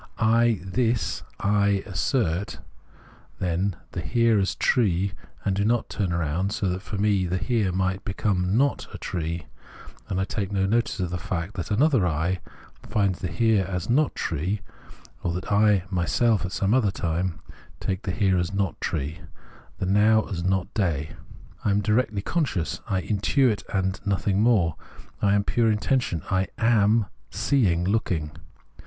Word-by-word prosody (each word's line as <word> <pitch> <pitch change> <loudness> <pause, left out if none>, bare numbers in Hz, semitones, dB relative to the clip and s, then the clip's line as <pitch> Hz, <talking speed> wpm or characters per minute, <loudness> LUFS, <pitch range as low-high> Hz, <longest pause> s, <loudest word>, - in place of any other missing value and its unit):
I, 115 -1 +3
this 115 +3 0 0.2
I, 100 -1 +2
assert, 100 - -1 0.8
then, 90 +1 -1 0.2
the 90 - -4
Here 115 +7 +3
as 95 - 0
tree, 100 -6 +2 0.3
and 100 -2 +1
do 100 - +1
not 115 +2 +1
turn 95 -4 -1
round 85 +4 -1
so 100 - -1
that 90 +1 -2
for 100 0 -6
me 100 -2 +2
Here 95 +3 0
might 95 +1 -1
become 95 0 0
not 140 +2 +1
a - - -7
tree, 85 -1 -4 0.6
and 95 - -1
I - - +2
take 100 0 -3
no 95 -1 +1
notice 115 +1 0
of 90 -2 -2
the 90 - -3
fact 95 0 -3
that 90 - -5
another 120 - +3
I 85 +3 0 0.5
finds 100 -4 +1
the 90 - -2
Here 105 +4 +2
as 90 +3 -2
not 145 +4 +2
tree, 90 +7 -2 0.6
or 85 - -1
that 90 +3 -5
I 105 -2 +4
myself 100 +4 +2
at - - -9
some 100 +1 +1
other 125 -5 +3
time 85 -1 -2 0.4
take 95 0 -2
the - - -5
Here 95 -1 +2
as 85 +2 -1
not 100 -2 -2
tree, 75 0 -2 0.6
the - - -2
Now 105 +3 +4
as 85 -4 -3
not 95 +2 0
day. 80 -7 -1 0.5
I - - +1
am 100 +1 +3
directly 105 0 +1
conscious, 130 - -1
I 95 -2 0
intuit 110 +2 +2
and 95 -1 0
nothing 100 0 +1
more, 110 -8 +4 0.5
1 - - +1
1 - - +4
am 100 - +2
pure 115 +1 +2
intuition; 110 - 0
I 95 0 +2
am 110 -1 +3
— - - -36
seeing, 95 -12 +1
looking. 90 -6 0
100 Hz, 165 wpm, -25 LUFS, 90-110 Hz, 0.8 s, I